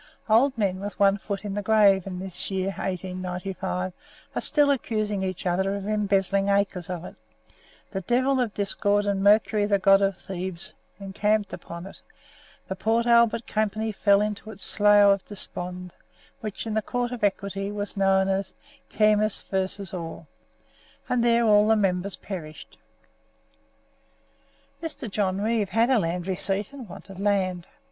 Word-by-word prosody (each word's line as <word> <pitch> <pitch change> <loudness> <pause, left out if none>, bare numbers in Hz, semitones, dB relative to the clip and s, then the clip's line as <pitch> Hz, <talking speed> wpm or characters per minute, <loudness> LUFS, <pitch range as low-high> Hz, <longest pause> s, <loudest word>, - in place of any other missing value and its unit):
Old 235 +4 +4
men 190 -4 0
with 205 +1 -6
one 200 -1 +5
foot 200 +1 -5
in 200 - -3
the 205 - -2
grave, 200 -2 +4
in 185 -2 -5
this 185 -1 -2
year 190 -1 -1
1895, 185 0 -4 0.4
are - - -2
still 290 -1 +3
accusing 215 -6 -1
each 185 -1 -4
other 190 +2 0
of 200 -1 -5
embezzling 200 -2 +1
acres 200 -3 0
of 180 -1 -5
it; - - -9 0.8
the 195 - -3
devil 255 +7 +1
of 245 -4 0
Discord, 205 0 +1
and 200 -1 0
Mercury 205 0 +4
the 200 -1 +3
god 195 0 +5
of 195 -1 +1
thieves, 185 -2 -4 0.3
encamped 205 +2 -1
upon 170 +1 -8
it; 195 - -10 0.7
the 190 - -4
Port 225 +4 +1
Albert 235 -1 +4
Company 215 +1 -1
fell 200 -1 +3
into 210 +1 -3
its 200 -3 -8
Slough 205 -1 +6
of 195 - -5
Despond, 180 -3 -6 0.5
which 215 0 -5
in 220 - -3
the 220 - +1
Court 245 +3 -2
of 245 -3 -6
Equity 200 0 -1
was 205 0 -5
known 195 -1 +3
as 195 0 -2 0.3
"Kemmis 215 0 +2
v. 190 0 -3
Orr," 165 -1 -7 0.8
and 245 -1 +1
there 235 0 +4
all 210 -1 +5
the 220 - +5
members 195 -2 0
perished. 155 -6 -9 2.0
Mr. 320 -6 -5
John 195 -2 -1
Reeve 215 -2 0
had 230 +5 +2
a 255 - +4
land 170 -1 -2
receipt, 195 +4 -2
and 255 -7 -9
wanted 190 +1 -11
land. 190 -3 0
200 Hz, 155 wpm, -25 LUFS, 190-215 Hz, 2.0 s, Slough